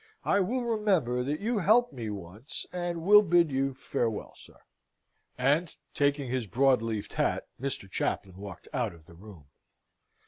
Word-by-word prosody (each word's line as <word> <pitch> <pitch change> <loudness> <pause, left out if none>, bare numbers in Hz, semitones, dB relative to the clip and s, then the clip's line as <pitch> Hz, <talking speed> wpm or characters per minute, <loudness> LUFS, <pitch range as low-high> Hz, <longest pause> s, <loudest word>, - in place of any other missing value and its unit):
I 200 - +3
will 240 +7 0
remember 190 - +1
that 145 +4 -2
you 225 +1 0
helped 220 +1 +4
me 115 -4 -5
once, 100 - -7
and 175 -2 -3
will 210 +3 +8
bid 175 -4 +3
you 135 0 0
farewell, 120 -4 -2
sir." - - -17 0.8
And, 145 +6 +1 0.2
taking 140 -1 +1
his 125 -2 -2
broad 130 +3 +3
leafed 110 -3 -4
hat, - - 0 0.2
Mr. 135 -7 -3
Chaplain 95 -1 -2
walked 100 -3 -9
out 120 -9 -1
of 80 -2 -19
the 85 - -16
room. 90 -3 -13
135 Hz, 160 wpm, -29 LUFS, 110-175 Hz, 0.8 s, will